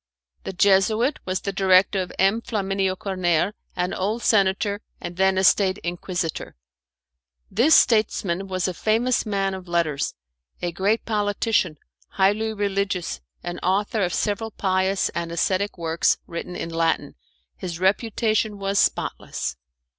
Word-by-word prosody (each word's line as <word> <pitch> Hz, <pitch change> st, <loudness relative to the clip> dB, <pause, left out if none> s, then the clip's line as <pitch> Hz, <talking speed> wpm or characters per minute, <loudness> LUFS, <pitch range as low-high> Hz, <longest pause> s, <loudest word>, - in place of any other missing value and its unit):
The -, -, -4 dB
Jesuit 205 Hz, +8 st, +3 dB
was 185 Hz, 0 st, -2 dB
the 200 Hz, -, -3 dB
director 190 Hz, 0 st, +4 dB
of 180 Hz, -, -5 dB
M. 195 Hz, +4 st, +3 dB
Flaminio 195 Hz, -4 st, -1 dB
Corner, 185 Hz, -1 st, 0 dB, 0.2 s
an 180 Hz, +1 st, -1 dB
old 215 Hz, +5 st, -2 dB
senator, 200 Hz, 0 st, +2 dB, 0.2 s
and 175 Hz, 0 st, -6 dB
then 190 Hz, +1 st, +2 dB
a 190 Hz, -, +2 dB
State 190 Hz, 0 st, +4 dB
Inquisitor. 175 Hz, -1 st, -4 dB, 1.0 s
This 245 Hz, +10 st, +5 dB
statesman 195 Hz, -4 st, +2 dB
was 185 Hz, -1 st, -1 dB
a 185 Hz, -, -2 dB
famous 225 Hz, +5 st, +1 dB
man 195 Hz, -2 st, 0 dB
of 190 Hz, -1 st, -8 dB
letters, 170 Hz, -5 st, 0 dB, 0.4 s
a 175 Hz, -, -2 dB
great 200 Hz, +6 st, 0 dB
politician, 205 Hz, -5 st, 0 dB, 0.3 s
highly 205 Hz, -, +1 dB
religious, 200 Hz, -, -2 dB, 0.2 s
and 175 Hz, 0 st, -5 dB
author 205 Hz, +4 st, 0 dB
of 180 Hz, -2 st, +1 dB
several 215 Hz, +5 st, -1 dB
pious 190 Hz, -1 st, 0 dB
and 170 Hz, -1 st, -4 dB
ascetic 190 Hz, +4 st, 0 dB
works 165 Hz, -1 st, +1 dB
written 170 Hz, +1 st, -6 dB
in 165 Hz, -, -5 dB
Latin. 165 Hz, 0 st, 0 dB, 0.4 s
His 175 Hz, -2 st, -6 dB
reputation 215 Hz, +2 st, +1 dB
was 195 Hz, 0 st, 0 dB
spotless. -, -, -1 dB
195 Hz, 135 wpm, -23 LUFS, 180-205 Hz, 1.0 s, This